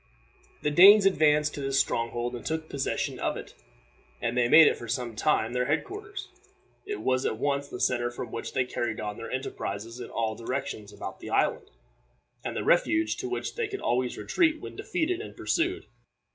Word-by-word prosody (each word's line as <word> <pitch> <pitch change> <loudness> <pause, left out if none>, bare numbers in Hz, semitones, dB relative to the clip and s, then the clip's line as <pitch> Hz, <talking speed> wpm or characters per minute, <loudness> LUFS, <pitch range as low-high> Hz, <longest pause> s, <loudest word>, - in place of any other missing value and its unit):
The 150 - +1
Danes 195 +6 +8
advanced 150 -5 +3
to 145 - -5
this 135 0 +1
stronghold 120 -1 -1
and 120 - -8
took 160 0 -3
possession 140 -3 -2
of - - -1
it, - - -9 0.7
and 115 +1 -2
they 125 -1 +3
made 160 +4 +9
it - - +4
for 120 - -9
some 120 -1 -3
time 115 -2 +1
their 125 0 +1
head 150 +3 +1
quarters. 405 0 -8 0.6
It 415 0 -4
was 130 0 +1
at 110 - -1
once 140 +2 -1
the - - -7
center 120 -1 +1
from 120 - -7
which 115 - -5
they 130 -1 +1
carried 120 -3 -3
on 105 -1 -4
their - - -7
enterprises 115 -3 -4
in - - -7
all 110 -1 -1
directions 115 -3 -4
about - - -7
the - - -8
island, - - +1 0.7
and - - -4
the - - -1
refuge 325 - +2
to 375 0 -4
which 375 - -3
they 465 -2 -2
could 400 -1 -6
always 125 0 0
retreat 320 -3 +1
when - - -9
defeated 350 +4 -1
and - - -10
pursued. 365 +2 0
140 Hz, 195 wpm, -28 LUFS, -, 0.7 s, made